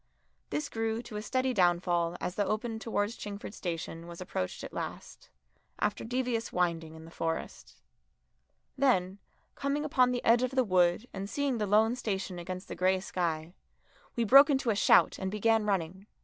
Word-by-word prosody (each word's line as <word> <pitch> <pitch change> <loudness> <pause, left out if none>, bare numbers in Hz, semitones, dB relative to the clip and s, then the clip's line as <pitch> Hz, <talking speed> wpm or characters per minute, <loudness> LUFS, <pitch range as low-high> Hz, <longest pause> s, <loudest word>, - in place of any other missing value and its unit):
This 300 -1 -2
grew 225 -1 -2
to 215 - -10
a 210 - -3
steady 255 +4 0
downfall 175 -3 +2
as 180 - -3
the 205 - 0
open 220 +2 -2
towards 220 0 -1
Chingford 205 0 -7
station 165 -2 -5
was 170 -1 -9
approached 95 - -4
at - - -8
last, - - -7 0.5
after 205 - -1
devious 245 -1 -2
winding 165 -3 -1
in 160 0 -11
the 165 - -13
Forest. 165 -1 -4 1.0
Then, 200 -9 +1 0.3
coming 280 +2 -2
upon 255 -4 +3
the 245 -1 -2
edge 235 +1 +5
of 255 +1 -1
the 260 - +4
wood 185 +1 +2
and 195 +1 -5
seeing 280 -3 -1
the 210 - 0
lone 220 +4 +4
station 195 -6 -3
against 185 +2 -6
the - - -6
grey 185 +1 +2
sky, 170 -3 -3 0.6
we 235 - +1
broke 275 +7 +8
into 270 -4 +2
a - - 0
shout 200 - +4
and 190 - -2
began 215 +1 +2
running. 190 0 -2
205 Hz, 175 wpm, -30 LUFS, 180-240 Hz, 1.0 s, broke